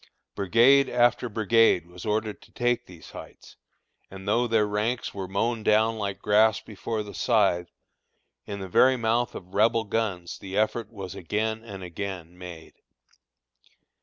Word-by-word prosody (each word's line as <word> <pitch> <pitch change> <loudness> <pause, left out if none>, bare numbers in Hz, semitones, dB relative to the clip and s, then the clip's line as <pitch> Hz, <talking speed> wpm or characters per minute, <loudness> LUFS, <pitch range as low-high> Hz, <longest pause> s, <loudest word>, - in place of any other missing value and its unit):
Brigade 120 +8 +4
after 120 0 +2
brigade 110 -4 +3
was 90 +3 -10
ordered 105 0 -1
to - - -19
take 120 0 0
these 90 -3 -13
heights, - - -12 0.5
and 95 +1 -10
though 120 +4 +2
their 110 -2 +3
ranks 105 +4 -2
were 95 -2 -5
mown 115 +4 -1
down 110 +1 +2
like 100 -2 -4
grass 105 +1 +4
before 110 +1 -5
the 105 - -10
scythe, 100 -7 +1 0.8
in 100 -1 -5
the 95 - -5
very 130 +8 +4
mouth 115 +1 0
of 90 0 -10
Rebel 115 +2 +3
guns 100 -5 -3
the 95 0 -6
effort 110 +1 0
was 95 -5 -7
again 110 +5 -2
and 100 -4 -9
again 90 -1 -6
made. 90 -3 -10
105 Hz, 150 wpm, -26 LUFS, 95-115 Hz, 0.8 s, Brigade